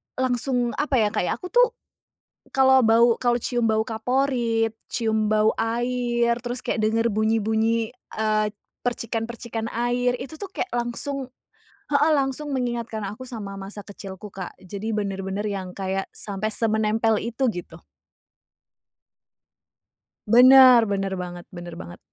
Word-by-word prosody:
langsung 245 -1 0
apa 290 - 0
ya 215 -4 +3
Kak, - - 0
ya - - 0
aku 365 - -9
tuh - - +4 0.8
kalau 265 -2 +5
bau 230 +1 +5
kalau 240 -1 +1
cium 240 -2 0
bau 220 -1 +2
kaporit, 230 -1 0 0.2
cium 220 -2 +1
bau 215 0 +3
air, 240 0 0
terus 245 +1 -4
kayak 220 - -2
dengar 230 +1 +2
bunyi-bunyi, 220 +1 +1 0.3
eee, 215 -1 +1 0.4
percikan-percikan 230 -1 -3
air 245 +1 +1
itu 280 +4 -8
tuh 400 +2 -7
kayak 375 - -3
langsung 255 +2 -3 0.6
heeh 295 +2 +4
langsung 275 +2 -1
mengingatkan 240 -5 -2
aku 215 +6 -7
sama 205 -5 -6
masa 195 +1 -8
kecilku 195 0 -9
Kak. 185 -2 -7
Jadi 200 +4 -6
bener-bener 200 -1 -2
yang 195 -3 -4
kayak 195 0 -3
sampai 205 +1 -3
semenempel 220 0 +2
itu 235 +4 -1
gitu. 175 -2 -8 2.6
Bener, 255 0 +9
bener 195 -1 -1
banget 175 -1 -8
bener 175 -1 -8
banget. 175 - -10
225 Hz, 130 wpm, -24 LUFS, 215-245 Hz, 2.6 s, Bener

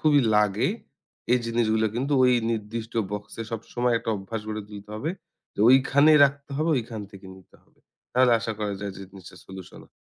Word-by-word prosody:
খুবই 150 -2 +4 0.2
লাগে, 105 0 +2 0.6
এই 125 - +5
জিনিসগুলো 110 -1 +1
কিন্তু 135 +5 -2
ওই 125 - +5 0.2
নির্দিষ্ট 110 +1 -4 0.2
বক্সে 105 +2 -6
সবসময় 120 +2 -1
একটা 115 - -4
অভ্যাস 100 +3 -6
গড়ে 110 -1 -4
তুলতে 105 0 -11
হবে। 145 +9 -3 0.4
তো - - -23
ঐখানেই 140 +4 +5
রাখতে 140 0 -2
হবে, 155 +3 0
ঐখান 115 -2 -6
থেকে 95 -1 -13
নিতে 95 - -20
হবে। - - -34 0.3
তাহলে 125 -1 +4
আশা 110 - -3
করা 105 -1 -2
যায় 100 -1 -4
যে - - -10
জিনিসটা 95 -3 -13
সলিউশন 95 -1 -11
হ - - -32
115 Hz, 180 wpm, -25 LUFS, 105-125 Hz, 0.6 s, এই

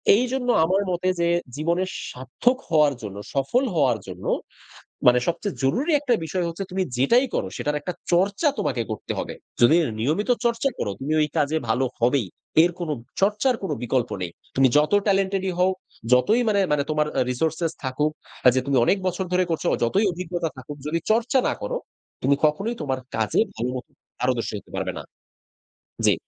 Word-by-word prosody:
এইজন্য 250 +2 0 0.2
আমার 190 +4 +2
মতে 180 +1 -1
যে, 170 - +2 0.3
জীবনের 170 +5 0 0.2
সার্থক 130 - 0
হওয়ার 150 -3 +4
জন্য, 100 -2 -7 0.2
সফল 140 - +1
হওয়ার 130 -7 +3
জন্য 90 -1 -8 0.8
মানে 125 0 +7
সবচেয়ে 170 - -2
জরুরি 265 - +1
একটা 255 -4 +1
বিষয় 180 +2 -1
হচ্ছে, 170 +4 -4
তুমি 190 0 0
যেটাই 235 - +4
করো, - - 0
সেটার 150 0 -1
একটা 180 +5 -4 0.2
চর্চা 195 - +2
তোমাকে 120 -2 0
করতে 110 - -5
হবে। - - -4 0.3
যদি 145 +7 +7 0.2
নিয়মিত 155 - 0 0.2
চর্চা 235 +3 +2
করো, 100 - -1
তুমি 145 +4 -2
ওই 150 - +2
কাজে 155 +1 +2
ভালো 125 +4 +2
হবেই, 120 -3 +2 0.4
এর 175 - +3
কোন, 170 -3 -3 0.3
চর্চার 210 +6 +3
কোন 185 - -2
বিকল্প 125 0 0
নেই। 90 -2 -3 0.2
তুমি 135 0 +5
যত 150 +4 +3 0.2
টেলেন্টেডই 195 -1 +1
হও, 185 +1 +4 0.4
যতই 210 - +4
মানে, 200 -2 +3
মানে 145 -1 +2
তোমার 150 0 +1
অ্যা - - +2
রিসোর্স 160 +5 -1 0.3
থাকুক, 150 +4 0 0.3
অ্যা 125 - +7
যে 130 - +3
তুমি 140 -2 +2
অনেক 195 - +3
বছর 185 +1 -1
ধরে 185 - +4
করছ, 165 - -1 0.2
যতই 195 - +2
অভিজ্ঞতা 175 -1 -3
থাকুক, 145 +3 -8
যদি 165 +2 0
চর্চা 235 +3 +3
না - - +1
করো, - - -2 0.5
তুমি 140 +2 +4
কখনোই 200 +11 0
তোমার 135 -3 -1 0.2
কাজে 110 -1 +1 0.2
ভালো 120 +2 -2
মত 125 - -5 0.3
পারদর্শী - - 0
হতে - - -13
পারবে - - -2
না। - - -6 1.0
জি। - - +6
165 Hz, 175 wpm, -24 LUFS, 135-195 Hz, 1.0 s, মানে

